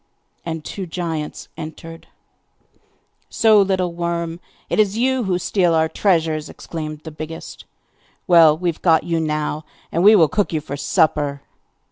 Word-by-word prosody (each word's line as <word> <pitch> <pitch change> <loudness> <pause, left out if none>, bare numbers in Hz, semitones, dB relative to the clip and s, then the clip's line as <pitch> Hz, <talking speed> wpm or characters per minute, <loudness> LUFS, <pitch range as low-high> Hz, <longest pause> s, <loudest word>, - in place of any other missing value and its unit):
And 160 -2 -5
two 190 -2 -6
giants 165 -3 -4
entered. 165 +1 -9 1.2
'So, 220 -3 +5
little 185 -3 0
worm! 170 -1 -3 0.3
it - - -1
is 210 0 +2
you 255 0 +1
who 185 -2 0
steal 180 -2 +1
our 160 0 +3
treasures!' 160 -4 0
exclaimed 155 -2 -7
the 160 - -8
biggest. 155 +2 -8 0.6
'Well, 165 -4 +6
we 180 +2 -3
have 165 - -6
got 165 -3 +4
you 165 -1 -1
now, 155 -1 -2 0.3
and 170 - 0
we 210 +2 +8
will 165 -6 +6
cook 200 +4 -1
you 155 - +1
for 145 -2 -6
supper! 145 0 0
165 Hz, 150 wpm, -20 LUFS, 155-180 Hz, 1.2 s, we